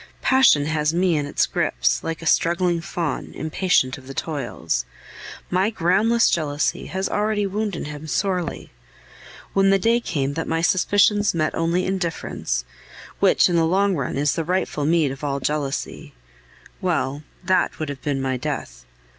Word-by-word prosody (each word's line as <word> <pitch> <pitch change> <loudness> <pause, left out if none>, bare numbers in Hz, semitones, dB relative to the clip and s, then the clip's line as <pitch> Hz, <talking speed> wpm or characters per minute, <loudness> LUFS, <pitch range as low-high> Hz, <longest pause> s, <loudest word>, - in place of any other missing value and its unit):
Passion 260 - +5
has 155 +1 0
me 180 -1 +2
in 145 -1 -1
its - - +1
grips, - - 0
like 165 0 -4
a - - -7
struggling 170 +1 +2
fawn, 170 -4 -4
impatient 155 -4 +1
of 130 - -16
the 135 - -8
toils. 135 - -2 0.7
My 185 +3 +2
groundless 220 +4 +2
jealousy 150 -3 -1
has 190 +1 -2
already 210 0 0
wounded 200 -2 -3
him 150 +1 -7
sorely. 180 0 -2 0.8
When 195 0 +4
the 195 - +5
day 230 +5 +2
came 145 - -2
that 165 +2 -3
my 165 0 -1
suspicions 205 +2 +3
met 155 -1 0
only 170 +2 0
indifference 170 - -2 0.5
which - - +4
in 175 - 0
the 165 -1 +3
long 195 +2 +2
run 135 -3 -3
is 145 0 +2
the 165 - -2
rightful 175 -4 -1
meed 160 -4 +2
of 135 +2 -9
all 140 -1 -1
jealousy 140 - -3 0.7
well, 150 -6 -1 0.2
that 185 +1 +1
would 155 -2 -4
have 140 -2 -6
been 140 -2 -1
my 130 -1 -1
death. - - -5
165 Hz, 160 wpm, -22 LUFS, 145-190 Hz, 0.8 s, Passion